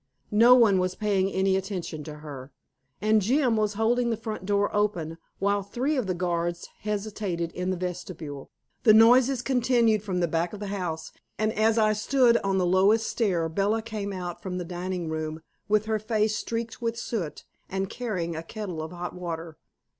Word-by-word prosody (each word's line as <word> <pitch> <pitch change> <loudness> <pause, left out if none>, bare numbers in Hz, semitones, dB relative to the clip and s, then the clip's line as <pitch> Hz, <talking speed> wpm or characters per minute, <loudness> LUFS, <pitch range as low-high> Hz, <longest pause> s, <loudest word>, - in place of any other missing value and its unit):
No 235 +4 +8
one 215 -6 +5
was 185 0 -1
paying 195 -2 +1
any 190 0 +2
attention 185 -5 -4
to 155 - -7
her. 135 -2 -8 0.5
And 215 0 +4
Jim 250 +3 +2
was 210 -1 0
holding 235 +3 +2
the 225 - 0
front 215 -4 -6
door 205 0 +1
open, 175 -6 -1 0.2
while 200 +1 +1
three 250 +9 -1
of 255 -7 -1
the 185 - 0
guards 175 -1 -2
hesitated 200 -5 -3
in 180 +1 -3
the 185 - -1
vestibule. 170 -5 -6 0.3
The 215 -3 +6
noises 245 +3 +6
continued 240 -4 +3
from 190 -3 -2
the 175 - +2
back 165 +3 -1
of 210 - -7
the 205 - -4
house, 165 -5 -4 0.3
and 215 0 0
as 220 +1 +2
I 215 -1 +4
stood 235 +2 +3
on 195 -3 0
the 185 - +2
lowest 195 +5 +4
stair 180 -8 +1
Bella 200 +6 0
came 215 -3 -4
out 180 -2 -5
from 180 -1 -4
the 180 - -4
dining 180 0 -4
room, 155 0 -4 0.3
with 215 0 +3
her 220 -1 0
face 215 0 0
streaked 230 +2 -4
with 230 -1 -1
soot, 200 -9 -4 0.2
and 195 0 -2
carrying 185 -8 -3
a 160 - -3
kettle 180 -2 -6
of 160 - -6
hot 175 0 -5
water. 165 -2 -5
200 Hz, 185 wpm, -27 LUFS, 175-220 Hz, 0.5 s, No